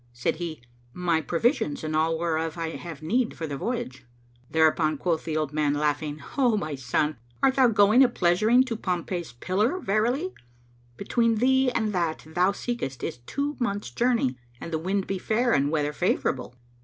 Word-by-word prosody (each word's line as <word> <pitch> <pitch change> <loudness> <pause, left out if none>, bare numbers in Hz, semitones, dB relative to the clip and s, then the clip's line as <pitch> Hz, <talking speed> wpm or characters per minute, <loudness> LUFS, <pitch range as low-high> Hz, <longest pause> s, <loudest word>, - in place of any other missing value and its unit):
said 120 +5 -1
he, 160 -6 -5 0.3
"My 170 -3 +1
provisions 240 - 0
and 155 0 -2
all 160 +1 +2
whereof 160 -1 -1
I 165 -1 -3
have 165 -3 -8
need 235 +8 0
for 165 - -3
the 145 -2 -4
voyage." 225 - -4 0.5
Thereupon 160 -1 +3
quoth 165 +1 -1
the 155 -1 -1
old 155 -2 -2
man, 150 -1 +1
laughing, 150 0 -1 0.2
"O 245 -5 +4
my 155 -6 -3
son, 135 +3 -1 0.3
art 270 -1 +5
thou 260 -2 +6
going 215 +3 +5
a 255 - +4
pleasuring 215 +5 +3
to 250 -3 -4
Pompey's 175 - -3
Pillar?[FN#509] 210 - 0
Verily, 245 - +1 0.6
between 230 +3 +1
thee 260 +3 +3
and 220 -4 -1
that 170 -4 -1
thou 180 +4 +2
seekest 200 - -4
is - - -4
two 285 +1 -2
months' 205 -5 -2
journey 235 - +1 0.2
and 165 - -7
the 160 - 0
wind 190 +3 -1
be 195 -1 -3
fair 235 +5 +1
and 140 0 +3
the - - -2
weather 150 -2 0
favourable." 130 -7 -1
175 Hz, 180 wpm, -26 LUFS, 155-230 Hz, 0.6 s, thou